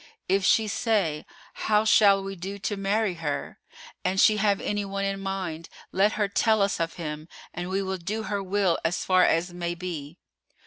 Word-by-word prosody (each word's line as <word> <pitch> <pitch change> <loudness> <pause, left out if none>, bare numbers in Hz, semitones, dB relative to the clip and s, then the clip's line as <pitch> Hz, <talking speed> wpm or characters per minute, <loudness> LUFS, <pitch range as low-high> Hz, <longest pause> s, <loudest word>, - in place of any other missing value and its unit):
If 195 +1 +2
she 220 +4 +4
say, 205 -8 0 0.3
How 215 0 +1
shall 200 -2 +5
we 195 0 -5
do 195 +3 -6
to 205 +1 -3
marry 200 +1 0
her? 145 -3 -3 0.4
An 185 +1 0
she 215 +2 +5
have 200 -1 +2
any 205 0 -2
one 195 0 -3
in 195 0 -2
mind, 185 -4 -4 0.2
let 200 +3 +3
her 210 -1 0
tell 215 +1 +2
us 200 - 0
of 165 0 -2
him, 155 -1 -6 0.2
and 175 +1 -5
we 195 +1 -1
will 190 -1 -3
do 210 +6 -3
her 205 -2 -2
will 195 -2 +1
as 165 +1 -1
far 185 -1 +4
as 175 +2 +1
may 175 -1 -3
be! 170 -3 -6
195 Hz, 190 wpm, -26 LUFS, 175-205 Hz, 0.4 s, shall